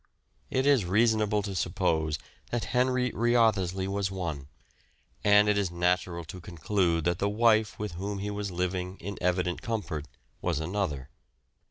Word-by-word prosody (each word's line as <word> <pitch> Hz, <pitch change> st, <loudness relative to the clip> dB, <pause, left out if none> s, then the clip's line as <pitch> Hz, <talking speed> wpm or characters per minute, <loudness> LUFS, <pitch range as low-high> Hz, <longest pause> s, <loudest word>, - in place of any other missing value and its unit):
It 130 Hz, +1 st, 0 dB
is 140 Hz, -6 st, +5 dB
reasonable 105 Hz, +2 st, +2 dB
to 100 Hz, -1 st, -4 dB
suppose 85 Hz, -4 st, 0 dB, 0.3 s
that 120 Hz, -2 st, -1 dB
Henry 125 Hz, 0 st, +2 dB
Wriothesley 110 Hz, -6 st, +2 dB
was 100 Hz, 0 st, -1 dB
one, 85 Hz, -8 st, -4 dB, 0.8 s
and 105 Hz, 0 st, +6 dB
it 105 Hz, -1 st, +3 dB
is 100 Hz, -3 st, 0 dB
natural 85 Hz, 0 st, 0 dB
to 90 Hz, +3 st, -9 dB
conclude 85 Hz, 0 st, 0 dB
that 85 Hz, +1 st, 0 dB
the 100 Hz, -, +1 dB
wife 110 Hz, -1 st, +3 dB
with 105 Hz, 0 st, -4 dB
whom 100 Hz, +4 st, -4 dB
he 100 Hz, +1 st, -3 dB
was 105 Hz, -1 st, -3 dB
living 90 Hz, +1 st, -2 dB
in 100 Hz, +3 st, -6 dB
evident 90 Hz, 0 st, 0 dB
comfort 95 Hz, -, -3 dB, 0.3 s
was 85 Hz, -4 st, 0 dB
another. 80 Hz, -6 st, -2 dB
95 Hz, 150 wpm, -28 LUFS, 85-105 Hz, 0.8 s, and